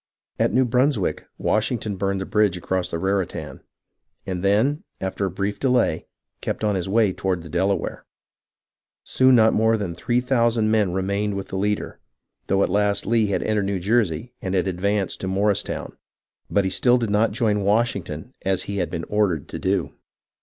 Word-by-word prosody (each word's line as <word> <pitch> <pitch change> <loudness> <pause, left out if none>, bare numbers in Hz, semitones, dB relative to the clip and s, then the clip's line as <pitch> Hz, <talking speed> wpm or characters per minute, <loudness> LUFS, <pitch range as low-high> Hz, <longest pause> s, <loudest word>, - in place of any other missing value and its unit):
At - - +2
New 130 0 +3
Brunswick, 125 -3 +1
Washington 110 -1 0
burned 95 0 -1
the - - -3
bridge 105 -4 +2
across 90 +1 -2
the 85 - -2
Raritan, 95 0 -2 0.6
and 90 -1 -4
then, 110 +10 +2 0.2
after 95 +1 -2
a - - -2
brief 100 +3 -3
delay, 125 -11 +1 0.3
kept - - -3
on 105 -1 +2
his 95 -1 -2
way 105 -2 +3
toward 90 -3 -2
the 85 - -10
Delaware. 95 +2 -1 1.0
Soon 130 0 +4
not 110 -1 +5
more 110 +1 +3
than 100 -5 -3
three 120 +8 0
thousand 115 -3 +2
men 105 -4 +2
remained 100 +2 -1
with 100 0 -5
the - - -5
leader, 105 +2 -2 0.5
though 95 +1 +2
at - - 0
last 100 +1 +1
Lee 115 0 +2
had 100 - -1
entered 105 -2 0
New 100 -1 -1
Jersey 105 0 0
and 95 0 -2
had 90 - +2
advanced 95 +2 -1
to 95 - -3
Morristown. 100 +2 -1 0.5
But 100 - +2
he 95 - -1
still 125 +4 +3
did 115 -4 -2
not 105 +2 +3
join 105 -3 +1
Washington 100 -2 -1
as 95 -1 0
he 100 - -4
had 90 -3 -1
been 85 -2 -4
ordered 100 -8 0
to - - -6
do. 95 -2 -1
100 Hz, 180 wpm, -23 LUFS, 95-110 Hz, 1.0 s, not